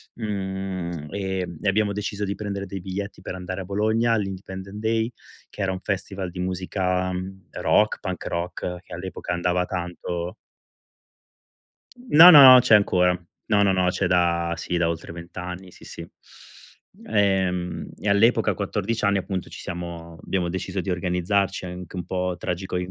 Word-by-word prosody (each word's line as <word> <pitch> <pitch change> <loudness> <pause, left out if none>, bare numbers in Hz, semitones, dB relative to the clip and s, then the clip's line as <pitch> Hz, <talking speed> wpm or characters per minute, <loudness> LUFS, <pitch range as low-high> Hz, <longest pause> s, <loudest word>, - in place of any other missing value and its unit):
mhmm, 95 -6 -4
ehm, 95 -3 -3
e - - -2
abbiamo 100 +1 +1
deciso 105 0 -3
di 100 - -2
prendere 100 -2 -4
dei 100 -2 -6
biglietti 100 +3 -5
per - - -6
andare 95 +1 -5
a - - -5
Bologna 110 +4 +1
all'Independent 95 -1 -4
Day, 110 +1 0 0.4
che - - -8
era 95 -1 +1
un 95 - -4
festival 95 -1 -3
di 90 - -8
musica 90 0 -1 0.4
rock, 105 - +2
punk 95 -1 -5
rock, 90 +1 -3
che - - -13
all'epoca 90 0 -5
andava 90 +1 0
tanto. 90 0 -4 1.7
No, 165 +4 +10
no, 150 -5 +11
no, 130 - +10
c'è 115 - +6
ancora. 90 -3 +3 0.3
No, 105 -2 +4
no, 100 - +4
no, 90 -1 +2
c'è 95 - -1
da 85 -1 +2
sì, 85 +1 -3
da 85 -1 +2
oltre 85 -1 -5
20 85 +1 -10
anni, 90 +1 -6
sì, - - -17
sì. 85 - -9 1.0
Ehm, 95 - 0
e 105 - -1
all'epoca 115 +3 +4
a - - -2
14 105 +2 -2
anni 100 0 +3
appunto 95 -1 -4
ci - - -10
siamo 85 -1 -7
abbiamo 90 -2 -1
deciso 95 +1 -3
di 90 - -5
organizzarci 90 +2 0
anche 90 0 -8
un 90 -2 -4
po' 90 0 -2
tragico 90 +1 -3
95 Hz, 160 wpm, -24 LUFS, 90-100 Hz, 1.7 s, no